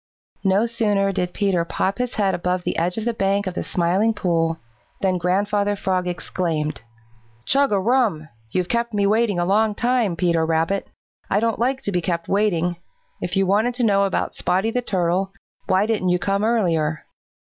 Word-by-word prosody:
No 195 Hz, +3 st, +3 dB
sooner 210 Hz, -4 st, +1 dB
did 180 Hz, -2 st, -2 dB
Peter 195 Hz, -4 st, +1 dB
pop 190 Hz, +4 st, -2 dB
his 250 Hz, -1 st, -2 dB
head 195 Hz, -3 st, +1 dB
above 180 Hz, +1 st, -1 dB
the -, -, -2 dB
edge 175 Hz, +4 st, 0 dB
of 220 Hz, -, -3 dB
the 235 Hz, -, 0 dB
bank 200 Hz, -1 st, 0 dB
of 185 Hz, -, -3 dB
the -, -, -3 dB
Smiling 190 Hz, +6 st, +1 dB
Pool 165 Hz, -3 st, 0 dB, 0.4 s
than 185 Hz, -2 st, +1 dB
Grandfather 205 Hz, +3 st, +1 dB
Frog 185 Hz, -2 st, -1 dB
exclaimed: 165 Hz, -4 st, -2 dB, 0.6 s
"Chug 275 Hz, -1 st, +3 dB
a 200 Hz, -, +2 dB
rum! 215 Hz, -8 st, +1 dB, 0.2 s
You've 180 Hz, +8 st, -1 dB
kept 235 Hz, 0 st, -1 dB
me 200 Hz, -1 st, +2 dB
waiting 215 Hz, -1 st, +2 dB
a 175 Hz, -, +1 dB
long 210 Hz, +3 st, +2 dB
time, 240 Hz, -6 st, +1 dB
Peter 170 Hz, -2 st, +1 dB
Rabbit. 165 Hz, +4 st, 0 dB, 0.4 s
I 200 Hz, -, +2 dB
don't 230 Hz, 0 st, 0 dB
like 260 Hz, +3 st, 0 dB
to 205 Hz, -, -2 dB
be 180 Hz, -2 st, 0 dB
kept 170 Hz, -1 st, -2 dB
waiting. 180 Hz, -4 st, +1 dB, 0.4 s
If 175 Hz, -, -3 dB
you 195 Hz, -, +3 dB
wanted 215 Hz, +6 st, +1 dB
to 245 Hz, -, -1 dB
know 200 Hz, -3 st, +3 dB
about 195 Hz, -, -1 dB
Spotty 190 Hz, +5 st, 0 dB
the 250 Hz, -, 0 dB
Turtle, 190 Hz, -2 st, 0 dB, 0.3 s
why 190 Hz, +2 st, +3 dB
didn't 215 Hz, -5 st, 0 dB
you 180 Hz, -, +3 dB
come 195 Hz, +3 st, -1 dB
earlier?" 170 Hz, -9 st, +1 dB
195 Hz, 185 wpm, -22 LUFS, 175-215 Hz, 0.6 s, No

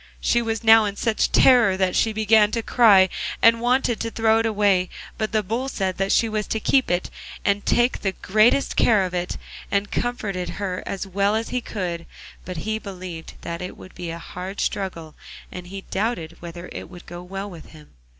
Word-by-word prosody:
She 240 Hz, -, +2 dB
was 225 Hz, -1 st, -3 dB
now 220 Hz, -1 st, +7 dB
in 200 Hz, -1 st, -3 dB
such 220 Hz, 0 st, 0 dB
terror 235 Hz, -7 st, +5 dB
that 190 Hz, -1 st, +1 dB
she 225 Hz, -, +2 dB
began 215 Hz, 0 st, +4 dB
to 230 Hz, -, -1 dB
cry, 205 Hz, -7 st, +6 dB, 0.3 s
and 230 Hz, 0 st, +5 dB
wanted 245 Hz, -1 st, +1 dB
to 230 Hz, -, -2 dB
throw 225 Hz, 0 st, +2 dB
it 225 Hz, -, +1 dB
away, 200 Hz, -4 st, +2 dB, 0.3 s
but 215 Hz, -1 st, -1 dB
the 215 Hz, -1 st, +1 dB
Bull 235 Hz, +7 st, -2 dB
said 190 Hz, -7 st, -2 dB
that 195 Hz, 0 st, 0 dB
she 230 Hz, -, +3 dB
was 215 Hz, -1 st, -2 dB
to 220 Hz, -, -1 dB
keep 265 Hz, +4 st, +2 dB
it, 175 Hz, +1 st, -1 dB, 0.3 s
and 200 Hz, 0 st, +1 dB
take 240 Hz, +1 st, +2 dB
the 195 Hz, -2 st, -1 dB
greatest 215 Hz, +9 st, +2 dB
care 215 Hz, -4 st, +4 dB
of 180 Hz, -, -6 dB
it, 180 Hz, 0 st, -2 dB, 0.3 s
and 200 Hz, +1 st, -1 dB
comforted 200 Hz, -7 st, -2 dB
her 190 Hz, -3 st, -3 dB
as 195 Hz, -, -3 dB
well 200 Hz, +2 st, +1 dB
as 225 Hz, +1 st, -2 dB
he 250 Hz, -, -2 dB
could, 175 Hz, -7 st, -4 dB, 0.4 s
but 180 Hz, -2 st, -6 dB
he 220 Hz, 0 st, -1 dB
believed 185 Hz, -5 st, -8 dB
that 170 Hz, 0 st, -5 dB
it 180 Hz, -, -6 dB
would 185 Hz, -, -13 dB
be 175 Hz, -1 st, -6 dB
a 165 Hz, -, -5 dB
hard 180 Hz, +3 st, -7 dB
struggle, 170 Hz, -5 st, -3 dB, 0.4 s
and 180 Hz, -1 st, -8 dB
he 195 Hz, +1 st, -7 dB
doubted 190 Hz, -6 st, -2 dB
whether 175 Hz, +1 st, -8 dB
it -, -, -8 dB
would 175 Hz, -1 st, -12 dB
go 175 Hz, 0 st, -8 dB
well 195 Hz, +2 st, -6 dB
with 170 Hz, -5 st, -11 dB
him. 155 Hz, -2 st, -16 dB
200 Hz, 205 wpm, -23 LUFS, 180-225 Hz, 0.4 s, now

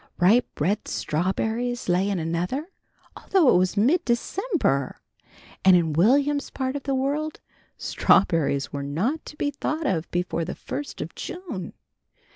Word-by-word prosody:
Ripe 210 Hz, +8 st, +3 dB
red 190 Hz, +8 st, 0 dB
strawberries 220 Hz, +9 st, -1 dB
lay 180 Hz, +3 st, +2 dB
in 200 Hz, -, 0 dB
another, 175 Hz, -, -2 dB, 0.5 s
although 345 Hz, -9 st, +3 dB
it -, -, +5 dB
was 185 Hz, +2 st, 0 dB
mid 290 Hz, -, +3 dB
December, 235 Hz, -, 0 dB, 0.6 s
and 190 Hz, -1 st, +7 dB
in 165 Hz, -3 st, +2 dB
Will'm's 280 Hz, -, +3 dB
part 260 Hz, 0 st, -3 dB
of 285 Hz, -, -3 dB
the 275 Hz, 0 st, -1 dB
world 290 Hz, +4 st, -1 dB, 0.4 s
strawberries 160 Hz, -8 st, +2 dB
were 140 Hz, -, -3 dB
not 180 Hz, -, -1 dB
to -, -, -9 dB
be 290 Hz, -, 0 dB
thought 310 Hz, +2 st, -3 dB
of 165 Hz, -, -1 dB
before 175 Hz, -1 st, -1 dB
the 175 Hz, -, -5 dB
first 290 Hz, -, -6 dB
of -, -, -6 dB
June. 350 Hz, -, -6 dB
220 Hz, 145 wpm, -25 LUFS, 175-285 Hz, 0.6 s, and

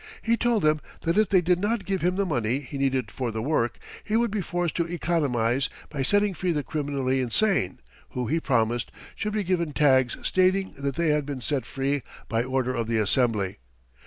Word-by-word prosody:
He 230 Hz, 0 st, +3 dB
told 235 Hz, -4 st, +1 dB
them 155 Hz, 0 st, +3 dB, 0.2 s
that 165 Hz, -, 0 dB
if 215 Hz, -2 st, +3 dB
they 190 Hz, -2 st, +5 dB
did 180 Hz, +1 st, +2 dB
not 210 Hz, +2 st, -1 dB
give 195 Hz, -2 st, -1 dB
him 180 Hz, +1 st, +1 dB
the 200 Hz, +1 st, +1 dB
money 125 Hz, -, 0 dB
he 140 Hz, +1 st, -7 dB
needed 130 Hz, -5 st, 0 dB
for 120 Hz, +4 st, -3 dB
the 110 Hz, 0 st, -4 dB
work, 125 Hz, -4 st, 0 dB, 0.3 s
he 215 Hz, +1 st, 0 dB
would 235 Hz, -2 st, +1 dB
be 210 Hz, -1 st, -1 dB
forced 175 Hz, -2 st, -2 dB
to 170 Hz, -1 st, -1 dB
economize 135 Hz, -8 st, +1 dB, 0.2 s
by 140 Hz, -, -3 dB
setting 205 Hz, +8 st, +2 dB
free 180 Hz, +1 st, -1 dB
the 150 Hz, -2 st, -1 dB
criminally 140 Hz, -3 st, -1 dB
insane, 125 Hz, -, +1 dB, 0.3 s
who, 125 Hz, -1 st, -3 dB
he 160 Hz, +8 st, +1 dB
promised, 120 Hz, -5 st, 0 dB, 0.2 s
should 210 Hz, -1 st, -3 dB
be 210 Hz, -1 st, 0 dB
given 170 Hz, -4 st, 0 dB
tags 130 Hz, -4 st, +3 dB
stating 185 Hz, +1 st, +2 dB
that 140 Hz, -1 st, -2 dB
they 170 Hz, -1 st, +1 dB
had 150 Hz, 0 st, +2 dB
been 140 Hz, -2 st, -4 dB
set 130 Hz, -2 st, -1 dB
free 140 Hz, +1 st, -1 dB, 0.3 s
by 115 Hz, +1 st, 0 dB
order 130 Hz, 0 st, -1 dB
of 115 Hz, -3 st, -2 dB
the 115 Hz, -1 st, 0 dB
Assembly. 105 Hz, -3 st, +1 dB
145 Hz, 205 wpm, -26 LUFS, 125-180 Hz, 0.3 s, they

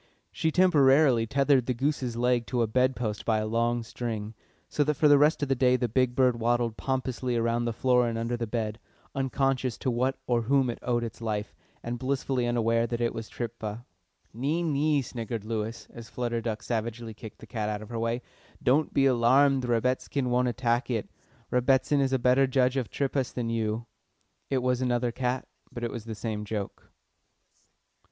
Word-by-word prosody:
She 160 Hz, -, 0 dB
temporarily 140 Hz, -8 st, +4 dB
tethered 135 Hz, 0 st, +2 dB
the 125 Hz, -, 0 dB
goose's 130 Hz, -2 st, -1 dB
leg 120 Hz, -1 st, +1 dB
to 120 Hz, -2 st, +1 dB
a -, -, +3 dB
bed 130 Hz, +4 st, +2 dB
post 105 Hz, -4 st, -3 dB
by 110 Hz, -1 st, +1 dB
a 110 Hz, -, -1 dB
long 115 Hz, +2 st, 0 dB
string, 115 Hz, -2 st, -5 dB, 0.3 s
so 145 Hz, -, +1 dB
that 150 Hz, +1 st, 0 dB
for 150 Hz, -, +4 dB
the 145 Hz, -1 st, +7 dB
rest 150 Hz, +1 st, +3 dB
of -, -, 0 dB
the 135 Hz, -, +2 dB
day 125 Hz, -1 st, +3 dB
the 125 Hz, -1 st, 0 dB
big 125 Hz, +2 st, +1 dB
bird 125 Hz, -3 st, +3 dB
waddled 120 Hz, -1 st, +1 dB
pompously 130 Hz, -1 st, -2 dB
about 115 Hz, +1 st, +1 dB
the 120 Hz, -, 0 dB
floor 125 Hz, +1 st, +2 dB
and 115 Hz, -1 st, -2 dB
under 115 Hz, +1 st, -1 dB
the 115 Hz, -1 st, -3 dB
bed, 110 Hz, 0 st, -3 dB, 0.3 s
unconscious 135 Hz, -2 st, 0 dB
to 130 Hz, -, -1 dB
what 130 Hz, +3 st, 0 dB
or 120 Hz, -1 st, +1 dB
whom 130 Hz, +1 st, +2 dB
it -, -, -9 dB
owed 120 Hz, -1 st, 0 dB
its 115 Hz, 0 st, -6 dB
life, 105 Hz, -2 st, -3 dB, 0.3 s
and 120 Hz, 0 st, -4 dB
blissfully 130 Hz, -2 st, -1 dB
unaware 115 Hz, -1 st, +1 dB
that 120 Hz, 0 st, -3 dB
it 120 Hz, -1 st, 0 dB
was 115 Hz, -1 st, -6 dB
tripha. 115 Hz, -1 st, -5 dB, 0.5 s
"Nee, 145 Hz, +9 st, -1 dB
nee," 150 Hz, -2 st, +1 dB
sniggered 115 Hz, -3 st, -5 dB
Lewis, 110 Hz, +1 st, -4 dB
as 115 Hz, -1 st, -10 dB
Flutter 120 Hz, -1 st, -2 dB
Duck 110 Hz, -1 st, -4 dB
savagely 115 Hz, 0 st, -3 dB
kicked 110 Hz, 0 st, -11 dB
the -, -, -12 dB
cat 110 Hz, -2 st, -3 dB
out 105 Hz, 0 st, -3 dB
of 110 Hz, -, -12 dB
her 115 Hz, -1 st, -4 dB
way. 115 Hz, +2 st, -1 dB, 0.4 s
"Don't 145 Hz, +4 st, +2 dB
be 135 Hz, -, +4 dB
alarmed, 130 Hz, +2 st, +4 dB
Rebbitzin 125 Hz, +2 st, 0 dB
won't 125 Hz, +1 st, +2 dB
attack 120 Hz, 0 st, 0 dB
it. 115 Hz, -4 st, -2 dB, 0.4 s
Rebbitzin 130 Hz, +3 st, +3 dB
is 135 Hz, -1 st, +1 dB
a 130 Hz, -, +3 dB
better 130 Hz, +2 st, +3 dB
judge 130 Hz, 0 st, +2 dB
of 130 Hz, -4 st, -1 dB
triphas 135 Hz, -2 st, -1 dB
than 115 Hz, -2 st, -3 dB
you." 110 Hz, 0 st, -1 dB, 0.6 s
It 130 Hz, -2 st, 0 dB
was 125 Hz, 0 st, +1 dB
another 120 Hz, -1 st, +1 dB
cat, 125 Hz, +1 st, -2 dB, 0.2 s
but 120 Hz, -, -7 dB
it 120 Hz, -, -2 dB
was 115 Hz, -2 st, -7 dB
the 110 Hz, -1 st, -5 dB
same 105 Hz, -1 st, -4 dB
joke. 105 Hz, -1 st, -5 dB
120 Hz, 195 wpm, -28 LUFS, 115-130 Hz, 0.6 s, the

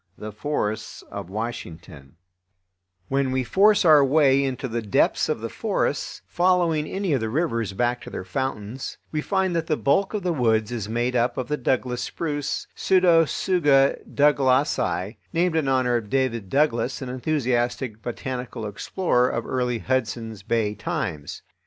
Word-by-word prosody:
The 105 Hz, 0 st, -7 dB
Forests 110 Hz, -2 st, -3 dB
of 100 Hz, -3 st, -6 dB
Washington 85 Hz, -, -7 dB, 0.9 s
When 135 Hz, -1 st, 0 dB
we 130 Hz, 0 st, 0 dB
force 200 Hz, -, +4 dB
our 155 Hz, -3 st, +7 dB
way 140 Hz, -1 st, +4 dB
into 130 Hz, -1 st, -2 dB
the 115 Hz, -1 st, -3 dB
depths 105 Hz, -3 st, +1 dB
of -, -, -1 dB
the -, -, -3 dB
forests, -, -, -2 dB
following 170 Hz, -, +2 dB
any 190 Hz, -4 st, -1 dB
of 135 Hz, -, +2 dB
the 110 Hz, -1 st, -2 dB
rivers 115 Hz, -, -1 dB
back 120 Hz, +4 st, 0 dB
to -, -, -9 dB
their -, -, -6 dB
fountains, 125 Hz, +2 st, -4 dB
we 155 Hz, -, -1 dB
find 190 Hz, 0 st, 0 dB
that 165 Hz, -1 st, -1 dB
the 155 Hz, -, +1 dB
bulk 195 Hz, +9 st, +1 dB
of 205 Hz, -, -3 dB
the 180 Hz, -2 st, 0 dB
woods 110 Hz, -5 st, +1 dB
is 110 Hz, -4 st, -4 dB
made 120 Hz, +2 st, -1 dB
up 120 Hz, 0 st, +1 dB
of 130 Hz, -, -3 dB
the 150 Hz, -, +1 dB
Douglas 125 Hz, -2 st, -1 dB
spruce 145 Hz, -1 st, -3 dB
(Pseudotsuga 165 Hz, -5 st, +3 dB
Douglasii), 135 Hz, -, +2 dB, 0.2 s
named 170 Hz, 0 st, +1 dB
in 155 Hz, -4 st, +1 dB
honor 130 Hz, -2 st, +2 dB
of 110 Hz, -3 st, -6 dB
David 115 Hz, -6 st, 0 dB
Douglas, 135 Hz, -2 st, +1 dB
an 130 Hz, -, -6 dB
enthusiastic 125 Hz, -4 st, -1 dB
botanical 125 Hz, -1 st, -5 dB
explorer 125 Hz, -, 0 dB
of 115 Hz, -, -3 dB
early 125 Hz, -2 st, -1 dB
Hudson's 115 Hz, -3 st, -2 dB
Bay 105 Hz, 0 st, 0 dB
times. 75 Hz, -7 st, -4 dB
130 Hz, 155 wpm, -24 LUFS, 115-150 Hz, 0.9 s, our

